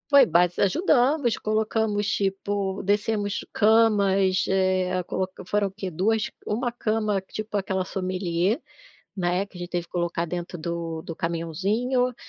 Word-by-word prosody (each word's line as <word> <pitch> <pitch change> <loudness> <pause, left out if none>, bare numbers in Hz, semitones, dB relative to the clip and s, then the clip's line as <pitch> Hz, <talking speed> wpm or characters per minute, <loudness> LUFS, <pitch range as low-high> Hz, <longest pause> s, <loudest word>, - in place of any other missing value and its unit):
Foi 280 -3 +8
bas 175 -3 +2
ajudamos, 260 - +3
colocamos, 215 -1 0
tipo, 195 -1 -1
descemos 205 0 0
camas, 200 -4 +4
eh, 185 -1 +1
coloc 185 +2 -3
foram 205 +1 +1
o - - -17
quê? 195 -1 -5
duas 210 +6 0 0.2
1 240 +4 -1
cama. 215 -3 0
tipo 215 +3 -6
aquela 190 -2 -1
sommelier, 185 +2 -1 0.5
né, 180 0 0
que 195 - -15
a - - -9
gente 175 0 -5
teve 175 -1 -2
que - - -36
colocar 175 -1 -1
dentro 175 +1 -5
do 165 -1 -4
do 165 - -6
caminhãozinho, 200 +11 0
195 Hz, 140 wpm, -25 LUFS, 180-215 Hz, 0.5 s, Foi